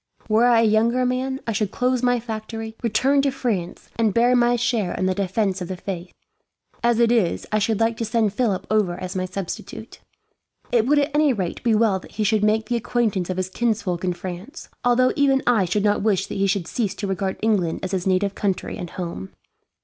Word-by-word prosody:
Were 225 +3 +4
I 235 -2 +5
a - - +3
younger 230 +3 +3
man, 260 +2 -1
I 230 - -1
should 210 -1 -1
close 250 +3 0
my 245 -1 +2
factory, 225 0 -6
return 260 +5 +2
to 280 - +2
France, 225 -10 -3
and 220 -4 +1
bear 240 +2 +4
my 240 0 +3
share 230 -5 0
in 185 - -1
the 185 - +2
defence 195 0 -1
of 180 - -4
the 185 0 -5
faith. 180 -1 -6 0.7
As 235 -1 +2
it 235 -1 +4
is, 220 -8 +1
I 215 - +2
should 215 0 0
like 225 0 +1
to 230 - -2
send 220 -2 +1
Philip 210 -5 0
over 200 -5 +1
as 185 +1 -6
my 185 0 -1
substitute. 185 0 -7 0.7
"It 235 -1 +2
would, 295 +2 +4
at 290 +1 +2
any 295 -2 +3
rate, 185 -6 -3
be 230 -2 +2
well 210 -3 +2
that - - -15
he 215 - -1
should 215 0 +2
make 215 +1 +2
the 240 - 0
acquaintance 225 -6 -1
of 185 - -2
his 185 0 -2
kinsfolk 210 -6 -1
in 180 -1 0
France; 185 - -8
although 255 +1 +3
even 275 -2 +3
I 230 -6 +3
should 195 +4 0
not 205 0 +2
wish 195 -3 +1
that - - -6
he 195 - +2
should 195 -3 0
cease 210 -6 -2
to 210 - -4
regard 195 0 -2
England 195 -7 +1
as 185 - -3
his 190 -1 -2
native 190 +1 +1
country 195 -2 -2
and 175 - -5
home. 170 - -6
215 Hz, 220 wpm, -22 LUFS, 190-240 Hz, 0.7 s, I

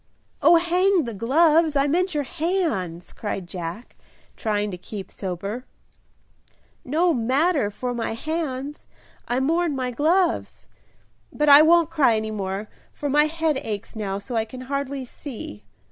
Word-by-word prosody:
"Oh, 340 - +7
hang 355 +2 +3
the 235 -3 -5
gloves! 305 - +3
I 275 0 +3
meant 355 +4 +1
your 295 - +1
hands," 275 - -2
cried 200 -3 -4
Jack, 175 +5 -7 0.4
trying 210 -2 -1
to 180 - -6
keep 195 +1 -8
sober. 195 +6 -5 1.2
"No 330 +6 +2
matter 265 - +2
for 245 +4 -4
my 230 -2 -2
hands, 295 -1 -4 0.4
I 245 +1 0
mourn 325 +3 +1
my 255 -1 -2
gloves. 335 +7 +1 0.7
But 300 0 +1
I 285 +1 +10
won't 330 0 +5
cry 280 -8 +4
any 220 0 -2
more, 200 0 -3 0.2
for 290 -1 -4
my 295 +2 +5
head 320 -2 0
aches 210 -4 -5
now 200 -3 -3
so 235 +5 -6
I 225 - +2
can 250 +3 -9
hardly 275 0 -3
see." 220 - -9
265 Hz, 145 wpm, -24 LUFS, 215-320 Hz, 1.2 s, I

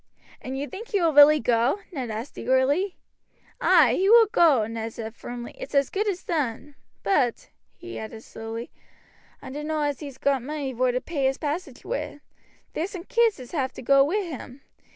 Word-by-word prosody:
"And 260 +1 -5
you 285 +2 -3
think 410 +7 -8
he 405 - 0
will 330 -3 +2
really 295 +1 +8
go?" 235 - +2
Ned 260 -8 -4
asked 220 +5 -6
eagerly. 280 +9 +1 0.7
"Ay, 315 -10 +5
he 380 +8 +2
will 460 0 +8
go," 320 - +4
Luke 225 0 -4
said 220 -1 -6
firmly, 240 0 -8
"it's - - -7
as 280 -1 +3
good 420 +2 -1
as 370 -3 -2
done; 295 -3 -2 0.3
but," 260 - +1 0.3
he 355 +1 -8
added 220 0 -8
slowly, 225 +1 -7 0.7
"I 260 - -8
dunno 300 +2 -3
as 290 -2 -1
he's 280 -4 -8
got 275 -1 +1
money 280 0 -4
vor 250 +1 +1
to 250 +1 -2
pay 290 -5 -2
his 265 0 +1
passage 315 +5 -4
wi'. - - -4 0.5
There's 335 +5 -2
some 365 -4 -7
kids 460 - +2
as 250 -2 -10
have 270 -6 -2
to - - -9
go 275 +2 +5
wi' 390 +9 0
him. 280 -5 -8
280 Hz, 190 wpm, -25 LUFS, 250-345 Hz, 0.7 s, really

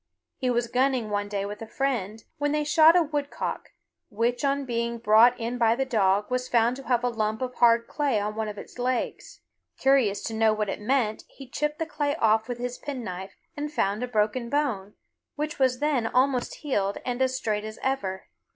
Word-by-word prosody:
He 255 -3 -1
was 240 -1 +1
gunning 250 -2 0
one 205 0 -1
day 200 -1 -2
with 205 +1 -7
a 225 - -6
friend, 225 -5 -2 0.2
when 290 0 0
they 300 0 +1
shot 315 +2 +6
a 355 - +5
woodcock, 290 -2 -4 0.4
which 235 +4 -1
on 280 0 +1
being 235 -1 -2
brought 230 +2 +5
in 235 +2 -3
by 230 -1 +4
the 270 +2 -1
dog 205 -3 +1
was 250 0 -1
found 235 +1 +3
to 270 - -11
have 245 -1 +2
a - - +2
lump 220 -2 -1
of 250 0 -4
hard 230 -1 +4
clay 280 -7 0
on 210 +1 -2
one 220 0 -3
of 210 -1 -6
its 245 - -11
legs. 250 0 -3 0.4
Curious 265 -7 +2
to 225 - -4
know 220 0 +3
what 210 -1 -2
it 195 - -4
meant 220 -2 0
he 270 - -12
chipped 300 +4 -2
the 325 - -2
clay 295 -2 -1
off 220 -5 +2
with 245 -1 -4
his 245 0 -5
penknife 195 -9 -6 0.2
and 295 0 -4
found 205 -6 0
a 250 - -2
broken 235 +1 0
bone, 235 -9 -1 0.4
which 300 0 -4
was 260 -1 +3
then 280 -5 +1
almost 255 +1 +1
healed 205 -9 -1
and 245 0 -2
as 260 0 +1
straight 210 -4 -1
as 215 0 -7
ever. 195 -9 -2
240 Hz, 205 wpm, -26 LUFS, 215-270 Hz, 0.4 s, shot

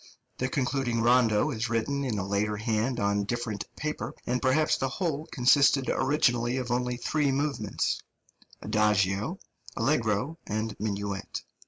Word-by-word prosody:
The 130 - 0
concluding 130 -3 0
rondo 120 +2 +4
is 115 -2 -2
written 140 +5 0
in 120 -6 -1
a 95 - -2
later 105 +1 0
hand 115 +3 0
on 100 0 +1
different 115 -1 -3
paper; 150 0 -4
and 125 +1 -1
perhaps 145 +4 +3
the 135 - -1
whole 155 0 -2
consisted 135 +1 +4
originally 125 -3 +1
of 125 -2 -3
only 125 0 0
three 145 +2 +1
movements 135 -7 -1 0.6
adagio, 105 -2 +1 0.4
allegro 115 +8 0
and 110 +1 -2
minuet. 100 -2 -3
120 Hz, 135 wpm, -28 LUFS, 105-135 Hz, 0.6 s, rondo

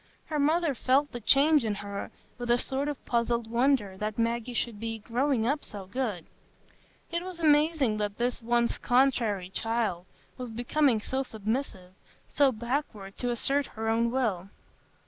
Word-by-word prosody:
Her 305 -2 -2
mother 315 +1 +2
felt 270 +3 +2
the 240 - -5
change 285 +5 +5
in 215 -2 -1
her 200 0 -5 0.3
with 240 0 -4
a 240 - +5
sort 270 +3 -1
of 295 -3 -5
puzzled 235 0 0
wonder 235 -6 +2
that 210 +1 -3
Maggie 235 +1 -1
should 230 -2 -1
be 225 0 -3
"growing 240 +2 0
up 285 +5 0
so 200 -2 -7
good"; 205 -5 -3 0.9
it 340 0 -1
was 365 -2 -7
amazing 300 -6 +3
that 205 -1 -2
this 245 0 -1
once 235 0 +1
"contrairy" 235 -7 +2
child 220 -6 -1 0.3
was 250 -1 -5
become 245 +2 +1
so 265 +4 -1
submissive, 220 -5 -4 0.3
so 285 -2 +3
backward 235 -4 -4
to 245 - -2
assert 270 +4 +1
her 225 0 -1
own 230 +1 +2
will. 215 -8 -1
240 Hz, 160 wpm, -28 LUFS, 215-275 Hz, 0.9 s, change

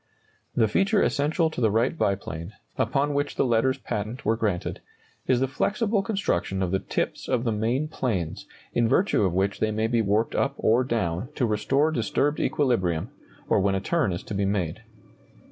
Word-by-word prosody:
The 115 -2 +4
feature 195 - +2
essential 160 +3 +1
to 140 - -5
the 110 - +4
Wright 115 +8 +1
biplane, 95 - -2 0.2
upon 145 +1 +1
which 145 +1 -1
the - - +2
letters 125 +2 +2
patent 105 +4 -4
were 110 - +3
granted, 105 -6 -2 0.5
is 125 -1 +3
the 135 - +2
flexible 205 - 0
construction 145 - -1
of 90 - -1
the 95 - +1
tips - - -3
of 125 -3 +1
the 115 - 0
main 115 +8 0
planes, 100 - -3 0.3
in 115 -1 +2
virtue 195 - +3
of 95 -3 +1
which 95 +1 0
they 110 - +1
may 110 +1 0
be 115 0 +2
warped 105 +2 +1
up - - 0
or 115 +4 +3
down 110 -3 -1
to 125 - +1
restore 135 +8 +1
disturbed 145 +3 0
equilibrium, 95 - 0 0.4
or - - +3
when 95 0 +2
a - - +1
turn 140 - 0
is 85 - -4
to 110 - -7
be 100 0 0
made. 95 -2 -1
115 Hz, 185 wpm, -26 LUFS, 100-140 Hz, 0.5 s, The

